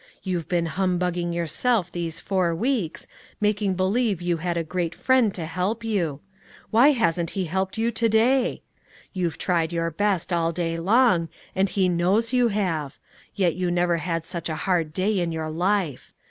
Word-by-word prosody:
You've 180 -3 -3
been 175 -2 +1
humbugging 180 -1 -1
yourself 175 +4 0
these 165 -2 -4
four 185 -4 0
weeks, 220 - -1 0.3
making 210 -2 +1
believe 200 +2 +1
you 175 -1 0
had 170 +1 -2
a 165 - 0
great 175 +1 -3
Friend 260 -5 +3
to 170 - -4
help 185 +8 -2
you: 170 -10 -1 0.5
why 235 +6 +6
hasn't 175 - +1
He 190 - 0
helped 190 +4 -2
you 230 +1 +1
to 230 0 +1
day? 245 +4 +2 0.5
You've 175 -4 -2
tried 170 -3 0
your 165 0 -1
best 190 0 0
all 165 -1 +1
day 165 -1 -2
long, 190 -3 +3 0.3
and 190 +1 +2
He 190 -1 +1
knows 190 +7 +1
you 250 -1 +4
have; 175 -10 -2 0.4
yet 180 -4 +2
you 180 0 -1
never 175 -1 +1
had 165 -1 -2
such 170 -2 -4
a 160 - -2
hard 175 -5 +1
day 190 +5 0
in 170 -1 -1
your 160 -1 -3
life. 175 -3 -1
180 Hz, 175 wpm, -24 LUFS, 170-210 Hz, 0.5 s, why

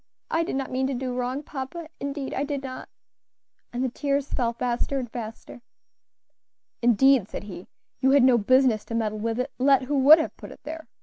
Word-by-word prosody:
I 325 - +2
did 330 - -3
not 270 0 -3
mean 260 +1 0
to 270 - -2
do 255 0 -3
wrong, 250 +3 -2
papa, 300 +4 -6
indeed 280 -1 -4
I 275 - -1
did 285 -1 -3
not," 255 -1 -7 0.8
and 245 +1 -2
the 260 - 0
tears 280 +2 -2
fell 240 -3 +1
faster 245 +3 -2
and 255 -2 -3
faster. 225 0 -8 1.2
"Indeed," 240 -1 +4
said - - -6
he, 190 -3 -9 0.3
"you 265 +1 +3
had 275 -1 +5
no 250 -2 +5
business 255 0 +3
to 230 - -5
meddle 215 -2 -1
with 225 +2 -2
it, 255 +2 -2
let 270 0 +4
who 280 +2 0
would 290 +4 +9
have 315 - -3
put - - -10
it - - -14
there. 320 +2 -7
260 Hz, 200 wpm, -25 LUFS, 240-275 Hz, 1.2 s, would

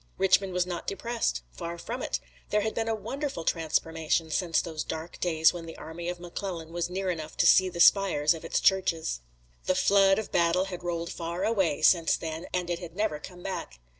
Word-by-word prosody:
Richmond 190 0 +3
was 180 0 +1
not 175 -2 -5
depressed. 230 +3 -2
Far 170 -1 -6
from 240 +9 -5
it. - - -2 0.3
There 210 - +2
had 220 +1 -1
been 225 0 -2
a 225 - +1
wonderful 235 - -4
transformation 160 0 0
since 170 -1 +1
those 160 -2 -3
dark 160 +1 -6
days 160 -2 +3
when 170 -2 -7
the 165 - -9
army 170 +2 -6
of 175 0 -4
McClellan 175 -2 -6
was 175 0 -1
near 190 0 -1
enough 160 -2 -6
to - - +3
see 185 0 +6
the 170 -1 -8
spires 170 -5 +5
of 165 - -9
its 165 - 0
churches. 165 - +1 0.4
The 185 - +2
flood 195 +1 +5
of 220 - -4
battle 170 +2 +3
had 185 -2 -6
rolled 170 -1 -3
far 170 +1 -4
away 195 -9 +1
since 170 -3 +5
then, 160 +1 -5
and 180 -1 -1
it 170 - -1
had 175 -2 -9
never 200 -7 -1
come 180 +3 -11
back. 65 - -5
175 Hz, 205 wpm, -28 LUFS, 165-195 Hz, 0.4 s, see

